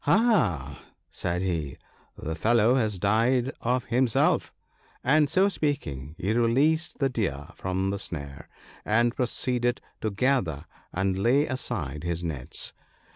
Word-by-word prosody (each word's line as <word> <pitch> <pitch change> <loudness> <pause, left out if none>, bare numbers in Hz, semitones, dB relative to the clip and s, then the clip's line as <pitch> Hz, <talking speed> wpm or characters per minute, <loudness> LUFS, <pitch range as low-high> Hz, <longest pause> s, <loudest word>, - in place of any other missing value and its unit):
" - - -19
Aha! 105 - +2
" - - -49
said 90 +1 -2
he, 80 -7 -2 0.2
" - - -33
the 80 - -4
fellow 115 +7 +3
has 110 -6 +1
died 115 +7 +2
of 125 +1 0
himself," 125 -1 +2 0.5
and 150 +2 +4
so 190 +5 +4
speaking, 80 - -2
he 100 +5 0
released 135 +8 +2
the 135 - +2
Deer 90 - -2
from 95 +1 -2
the 100 - -3
snare, 70 -6 -6 0.3
and 120 +3 +2
proceeded 125 -1 0 0.2
to 110 - 0
gather 100 - 0 0.3
and 95 0 0
lay 130 +8 +3
aside 85 - -3
his 85 0 -2
nets. 75 -7 -4
110 Hz, 140 wpm, -27 LUFS, 85-130 Hz, 0.5 s, and